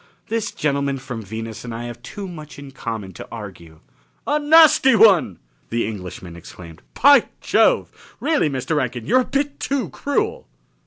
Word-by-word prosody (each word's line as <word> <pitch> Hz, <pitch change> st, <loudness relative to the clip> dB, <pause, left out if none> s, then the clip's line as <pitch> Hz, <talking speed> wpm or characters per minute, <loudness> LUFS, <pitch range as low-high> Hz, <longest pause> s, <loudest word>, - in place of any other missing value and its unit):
"This 225 Hz, -1 st, -2 dB
gentleman 140 Hz, -2 st, -1 dB
from 125 Hz, -3 st, -7 dB
Venus 110 Hz, +2 st, -7 dB
and 120 Hz, -2 st, -6 dB
I 115 Hz, -, -5 dB
have 120 Hz, 0 st, -8 dB
too 200 Hz, +10 st, -8 dB
much 155 Hz, -4 st, -10 dB
in 140 Hz, -1 st, -10 dB
common 110 Hz, -7 st, -6 dB
to -, -, -10 dB
argue." 90 Hz, -8 st, -10 dB, 0.4 s
"A 295 Hz, +1 st, +1 dB
nasty 300 Hz, -4 st, +6 dB
one!" 180 Hz, -, +5 dB, 0.3 s
the 115 Hz, 0 st, -1 dB
Englishman 90 Hz, -4 st, -8 dB
exclaimed. 85 Hz, -1 st, -12 dB, 0.2 s
"By 285 Hz, +1 st, +7 dB
Jove! -, -, +1 dB
Really, 300 Hz, -, +1 dB
Mr. 140 Hz, +3 st, -2 dB
Rankin, 125 Hz, -4 st, -2 dB
you're 255 Hz, +4 st, +4 dB
a -, -, -3 dB
bit 280 Hz, +1 st, -2 dB
too 275 Hz, -2 st, -2 dB
cruel!" 435 Hz, +12 st, -2 dB
135 Hz, 160 wpm, -21 LUFS, -, 0.4 s, By